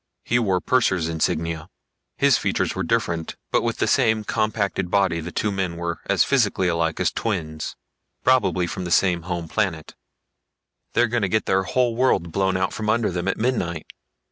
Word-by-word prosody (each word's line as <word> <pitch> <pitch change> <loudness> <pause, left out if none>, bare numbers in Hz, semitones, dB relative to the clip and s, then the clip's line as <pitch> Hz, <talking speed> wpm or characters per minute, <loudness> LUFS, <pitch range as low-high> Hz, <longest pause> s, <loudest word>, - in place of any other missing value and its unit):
He 120 - +1
wore 95 -6 +1
purser's 95 -7 +1
insignia. 80 0 -2 0.5
His - - +4
features - - 0
were 95 - -3
different, 85 -4 -1 0.2
but - - +3
with - - -2
the - - +1
same 110 -1 +2
compacted 105 -4 -1
body 95 -3 +2
the 85 +2 -6
two 105 - -1
men 95 -4 -2
were 85 0 -3
as - - +4
physically 105 -8 +2
alike 85 -2 0
as - - +2
twins. 80 -8 -3 0.5
Probably 120 -8 +3
from 90 +2 -5
the 90 - -4
same 85 -1 +3
home 85 -1 -4
planet. 85 -4 -2 1.0
"They're 120 - +4
gonna 115 -3 0
get 110 +1 +1
their 95 0 +2
whole 120 +4 0
world 115 -9 +1
blown 95 +1 +1
out 95 - -1
from 110 -1 -3
under 110 -2 +2
them 90 +1 -3
at 100 - 0
midnight. 110 -10 -1
95 Hz, 175 wpm, -23 LUFS, 85-110 Hz, 1.0 s, His